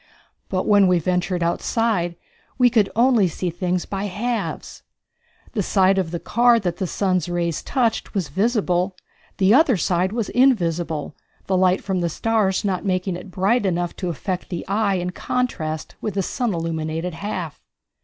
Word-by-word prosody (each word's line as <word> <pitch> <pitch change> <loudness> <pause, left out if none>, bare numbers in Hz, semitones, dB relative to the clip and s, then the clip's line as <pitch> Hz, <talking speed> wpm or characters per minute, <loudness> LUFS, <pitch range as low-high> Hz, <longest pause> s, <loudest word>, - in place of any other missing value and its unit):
But 185 -1 -1
when 205 -2 +5
we 180 -1 +4
ventured 180 +1 0
outside 175 0 0 0.4
we 250 -1 +5
could 220 -4 +3
only 235 -4 +4
see 175 +1 -3
things 180 +1 -1
by 195 0 -3
halves. 225 +5 -3 0.7
The 215 - -1
side 195 0 +3
of 180 -3 -1
the 170 +1 -4
car 235 +3 +3
that 175 -4 -2
the 190 - -2
sun's 185 -1 0
rays 170 -2 -1
touched 235 -6 -1
was 185 -6 -1
visible, 190 -3 0 0.4
the 195 +2 +4
other 265 - +5
side 180 +2 +1
was 230 -1 -2
invisible, 170 - +1 0.3
the 190 - 0
light 185 0 +3
from 190 -2 -1
the 170 -1 0
stars 210 +1 0
not 190 -3 -1
making 185 -1 -1
it 180 - -9
bright 195 +7 +1
enough 175 -2 -1
to 180 - -3
affect 180 +3 -4
the 175 -3 -5
eye 200 0 +1
in 180 0 -2
contrast 160 -10 -3
with 215 - -3
the 195 - +1
sun 240 +4 -1
illumined 160 -1 -3
half. 175 -4 -5
185 Hz, 165 wpm, -22 LUFS, 175-215 Hz, 0.7 s, when